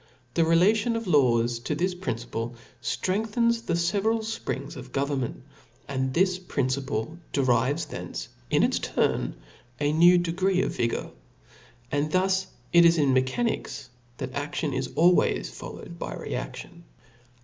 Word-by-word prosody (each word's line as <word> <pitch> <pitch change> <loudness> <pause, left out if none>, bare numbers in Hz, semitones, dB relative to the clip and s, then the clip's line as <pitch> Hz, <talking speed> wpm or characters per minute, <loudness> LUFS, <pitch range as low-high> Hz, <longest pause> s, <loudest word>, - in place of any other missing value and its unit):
The - - +2
rela 165 +6 +5
tion 230 +2 0
of 230 0 -3
laws 120 -8 +3
to 140 +6 -2
this 180 +4 0
principle, 120 -8 -4 0.3
ftrengthens 225 - 0
the 170 - +1
fe 170 +4 +1
veral 225 +2 +1
fprings 220 -11 -4
of 130 -1 -9
government; 135 -2 -2 0.4
and 130 -1 -1
this 185 +1 +3
principle 140 -3 -2
derives 135 +3 +2
from - - -17
thence, - - -6 0.2
in - - +3
its - - +2
turn, - - 0 0.4
a 145 0 +1
new 175 +3 +7
degree 185 +2 +1
of - - -2
vigour. 115 0 -1 0.8
And 145 +2 0
thus 190 +1 +2 0.3
it 170 0 +8
is 170 0 +6
in 140 -4 +3
mechanics, 130 - -1 0.3
that 130 - -5
aftion 145 +1 -2
is 130 -1 -2
always 175 +2 +3
followed - - -9
by - - -4
rcaftion. - - -6
160 Hz, 145 wpm, -26 LUFS, 130-185 Hz, 0.8 s, it